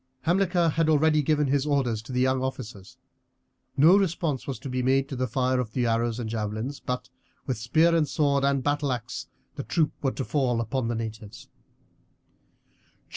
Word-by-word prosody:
Hamilcar 175 -1 +2
had 160 +1 +1
already 155 0 +4
given 150 0 +1
his 140 +1 0
orders 130 -7 0
to 120 - -11
the 125 0 0
young 130 0 +2
officers. 120 -7 -6 0.8
No 160 +7 +7
response 170 -8 0
was 135 -3 -3
to - - -6
be 130 -1 -2
made 135 +2 +2
to 135 - -4
the 130 0 -1
fire 130 +2 0
of 115 -3 -3
the 125 -2 0
arrows 115 0 0
and 115 - -3
javelins, 110 +5 -3
but 125 0 -4 0.4
with 130 -5 -2
spear, 160 +8 +3
sword, 140 -2 +1
and 140 -1 +1
battleaxe 135 -5 -2 0.3
the - - -3
troops 150 +7 0
were 135 -2 0
to 135 - -4
fall 130 -5 0
upon 115 +2 -2
the 120 - -1
natives. 110 -2 -7
130 Hz, 175 wpm, -26 LUFS, 120-150 Hz, 0.8 s, No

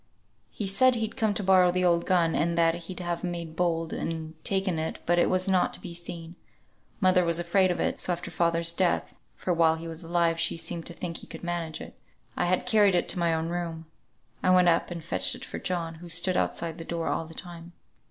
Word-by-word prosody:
He 210 - -5
said 255 +6 +4
he'd 225 -1 -3
come 215 -2 0
to 205 - -2
borrow 185 -1 +5
the 180 +1 +1
old 170 -1 +2
gun, 170 -3 +3
and 170 +3 0
that 165 -1 +4
he'd 175 +2 -7
have 175 -1 -3
made 170 -3 -4
bold, 165 -2 0
and 160 -1 -4
taken 190 -4 +1
it, 160 - -3
but 175 +1 +3
it - - +3
was 185 0 +2
not 185 -2 +2
to - - -10
be 175 - -8
seen. 170 -1 -6 0.7
Mother 185 -2 +4
was 170 -1 +1
afraid 185 +2 +2
of 175 - -1
it, - - -1
so - - +1
after 175 0 -4
father's 170 0 +1
death 180 +1 0 0.2
(for 180 - -1
while 165 -1 +4
he 165 +1 -7
were 165 - -5
alive, 165 0 +1
she 170 - 0
seemed 165 0 -4
to 170 - -5
think 170 -1 -5
he - - -11
could - - -10
manage 170 -2 -3
it) - - -9 0.4
I - - 0
had 180 +1 +1
carried 210 -5 +4
it 175 - +1
to 180 - -2
my 170 -1 +2
own 160 0 -1
room. 170 -2 -4 0.6
I - - +2
went 180 -1 +6
up 165 - +2
and 170 -2 -6
fetched 165 - +2
it - - -8
for - - -6
John, 170 -2 -2
who 170 +2 -11
stood 180 +2 +2
outside 170 -2 -1
the - - -5
door 165 0 -3
all 165 - -1
the 165 0 -12
time." 170 0 -9
170 Hz, 235 wpm, -27 LUFS, 165-180 Hz, 0.7 s, went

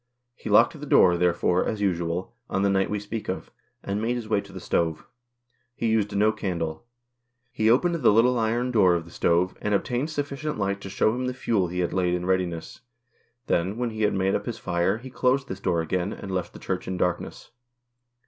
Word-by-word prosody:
He - - -8
locked - - +4
the - - -6
door, 90 -1 +6
therefore, 90 +1 +2
as 110 - -2
usual, 90 -2 -1 0.2
on 95 - 0
the 100 - +3
night 95 0 +1
we 105 - -1
speak 105 +2 -6
of, - - -4 0.3
and 100 +2 -2
made 120 +2 0
his 120 -3 -5
way 105 -2 +1
to - - -14
the - - -8
stove. 80 -2 -1 0.7
He 115 - -1
used 105 -2 +1
no 105 +2 +4
candle. 90 -3 -4 0.6
He 110 -2 +1
opened 155 +9 +3
the 155 -8 +3
little 120 +3 +4
iron 120 +3 0
door 95 -7 +4
of 85 -1 -3
the 85 - -14
stove, 85 +2 +1
and 105 -1 +1
obtained 125 +8 -1
sufficient 145 0 -3
light 100 -1 -1
to 100 - -7
shew 95 - +2
him 125 +1 -2
the 125 - -3
fuel 105 -7 0
he 90 +1 -2
had 85 - -1
laid 90 -2 +1
in 90 0 -3
readiness; 90 0 -2 0.6
then, 95 +2 0
when 120 -1 -1
he 110 0 -5
had 105 -1 +2
made 95 0 +1
up - - -2
his 115 -2 -3
fire, 90 +2 0
he 130 +3 -10
closed 130 +2 +1
this 95 - -6
door 85 -4 0
again, 90 +4 -1
and 100 - -7
left 90 -1 -3
the - - -10
Church - - -4
in 95 0 -3
darkness. 90 -1 -2
100 Hz, 215 wpm, -25 LUFS, 90-115 Hz, 0.7 s, door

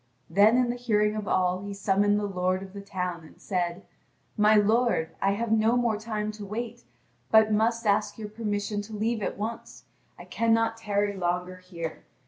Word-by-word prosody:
Then 205 +6 +5
in 250 -1 +2
the - - -4
hearing 210 -3 +1
of 215 -1 -4
all 185 0 +1
he 200 0 -6
summoned 205 +1 +2
the 210 - -2
lord 185 -1 -1
of 190 -1 -11
the 200 - -7
town 180 -4 -4
and 155 - -16
said: 180 -1 -2 0.5
"My 215 0 +5
lord, 215 -4 +2
I 195 0 +2
have 230 +2 -2
no 225 +2 +3
more 235 -3 +1
time 215 -1 -3
to 215 -1 -9
wait, 230 +3 -6 0.4
but 220 0 +5
must 230 +2 +1
ask 210 0 +1
your 215 -2 -6
permission 205 -1 -2
to 210 +2 -10
leave 225 +1 -1
at - - -3
once; 225 +3 -6 0.3
I - - -11
cannot 225 0 +1
tarry 205 -2 -1
longer 180 0 -2
here. 175 -3 -7
210 Hz, 185 wpm, -27 LUFS, 195-225 Hz, 0.5 s, Then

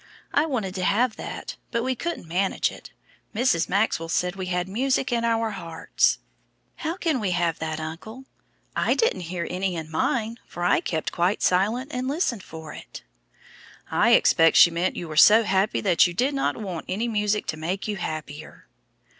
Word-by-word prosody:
I 295 +3 +3
wanted 220 -10 -2
to 185 -1 -3
have 220 +5 +2
that, - - -7
but 235 -1 -1
we 260 +1 0
couldn't 335 - -5
manage 185 +4 0
it. - - -12 0.5
Mrs. 215 -8 +2
Maxwell 190 -4 0
said 180 +2 0
we 190 -1 -5
had 180 0 -1
music 260 +6 0
in 235 -1 0
our 230 -1 +1
hearts; 165 -5 0 0.6
how 325 +3 -3
can 320 -8 0
we 205 -4 -1
have 170 -2 0
that, 160 0 -3
uncle? 180 +11 -8 0.5
I - - +2
didn't 185 - 0
hear 175 -1 -3
any 185 0 -2
in 160 -1 -6
mine, 225 +7 -1
for 175 - -6
I - - +4
kept 160 -2 -3 0.3
silent 220 +10 +1
and 250 +1 -2
listened 275 - -1
for 160 -3 -10
it." - - -10 0.9
"I - - +4
expect 165 0 +5
she 170 - +8
meant 170 +3 -1
you 175 - -5
were 155 - -7
so 215 +8 +7
happy 195 0 +1
that 185 -3 +4
you 175 - -7
did 260 +8 +1
not 275 - 0
want 185 -7 -5
any 210 +6 -1
music 210 -2 0
to 155 - -3
make 180 +6 -3
you 210 -1 -2
happier." 155 -2 -7
195 Hz, 180 wpm, -25 LUFS, 170-235 Hz, 0.9 s, she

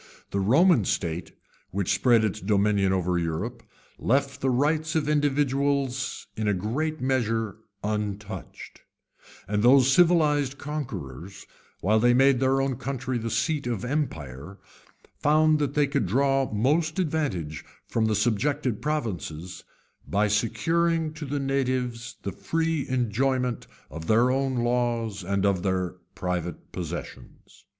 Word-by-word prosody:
The 100 - 0
Roman 135 - +4
state, 85 -3 -2 0.4
which 100 0 0
spread 115 +3 +4
its 110 0 -1
dominion 100 -1 +2
over 90 -1 +1
Europe, 90 +9 -3 0.4
left 135 +3 0
the 135 - +1
rights 155 +5 +1
of 155 -2 +1
individuals 140 -2 0
in 110 -1 -2
a 105 - +2
great 145 - -2
measure 115 -5 0 0.3
untouched; 105 -2 -5 0.7
and 105 +1 0
those 130 +2 +6
civilized 150 -5 +3
conquerors, 100 - -6 0.4
while 110 +4 +3
they 120 +2 +4
made 135 0 +5
their 135 +1 +2
own 135 -2 -1
country 130 -2 -3
the 115 0 -3
seat 125 +5 0
of 120 -1 -2
empire, 90 - -4 0.6
found 155 +1 +4
that 145 -1 -1
they 150 -1 +4
could 135 -8 -1
draw 135 +5 +2
most 150 - +1
advantage 145 - -2 0.2
from 115 -1 0
the 110 -1 +1
subjected 120 +2 0
provinces, 95 - -3 0.4
by 100 +8 +2
securing 160 +10 +1
to 160 -1 -7
the 145 +1 -2
natives 130 -3 -1
the 100 - -3
free 165 +1 -1
enjoyment 125 0 0 0.2
cf 80 +2 -7
their 115 +6 +4
own 135 0 0
laws 120 -4 0
and 100 +2 0
of 100 -3 +2
their 95 -1 -1 0.2
private 90 -2 -4
possessions. - - -8
120 Hz, 130 wpm, -26 LUFS, 100-140 Hz, 0.7 s, those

